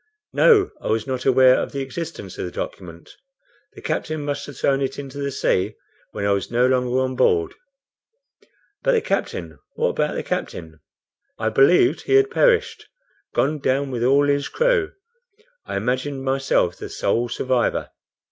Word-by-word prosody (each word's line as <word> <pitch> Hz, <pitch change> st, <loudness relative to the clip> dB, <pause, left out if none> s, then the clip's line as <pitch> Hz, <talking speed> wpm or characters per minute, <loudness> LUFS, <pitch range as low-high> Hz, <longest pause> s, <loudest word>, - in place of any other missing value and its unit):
"No; 415 Hz, -5 st, +5 dB
I -, -, -6 dB
was 110 Hz, 0 st, 0 dB
not 130 Hz, -2 st, -4 dB
aware 130 Hz, -1 st, +6 dB
of -, -, -5 dB
the 140 Hz, -, -3 dB
existence 135 Hz, -, -7 dB
of -, -, -2 dB
the 90 Hz, -, -6 dB
document. 85 Hz, -2 st, -7 dB, 0.6 s
The -, -, -13 dB
captain 155 Hz, -2 st, -3 dB
must 145 Hz, -1 st, -3 dB
have 145 Hz, -3 st, -10 dB
thrown 135 Hz, 0 st, +1 dB
it 135 Hz, 0 st, -2 dB
into 140 Hz, 0 st, -7 dB
the 140 Hz, 0 st, -2 dB
sea 95 Hz, -8 st, 0 dB, 0.4 s
when 100 Hz, -1 st, -4 dB
I 100 Hz, -, +2 dB
was 100 Hz, -1 st, -1 dB
no 120 Hz, +1 st, +2 dB
longer 125 Hz, -1 st, +1 dB
on 130 Hz, 0 st, -2 dB
board." 415 Hz, -, +2 dB, 1.3 s
"But -, -, +2 dB
the 460 Hz, -, +3 dB
captain? 85 Hz, -, -3 dB, 0.2 s
What -, -, +1 dB
about -, -, -1 dB
the -, -, -3 dB
captain?" 80 Hz, -2 st, -5 dB, 0.6 s
"I 110 Hz, 0 st, 0 dB
believed 170 Hz, -, +4 dB
he 400 Hz, -, +1 dB
had 405 Hz, +1 st, +4 dB
perished; 470 Hz, -1 st, +2 dB, 0.5 s
gone 150 Hz, +2 st, +1 dB
down 135 Hz, 0 st, 0 dB
with 120 Hz, -2 st, -2 dB
all 140 Hz, +3 st, +4 dB
his 140 Hz, 0 st, +1 dB
crew. 485 Hz, -5 st, +1 dB, 0.8 s
I -, -, -3 dB
imagined 130 Hz, +5 st, -2 dB
myself 135 Hz, -9 st, +1 dB
the -, -, -7 dB
sole 120 Hz, +4 st, -1 dB
survivor." 125 Hz, +1 st, -1 dB
135 Hz, 165 wpm, -22 LUFS, 120-155 Hz, 1.3 s, aware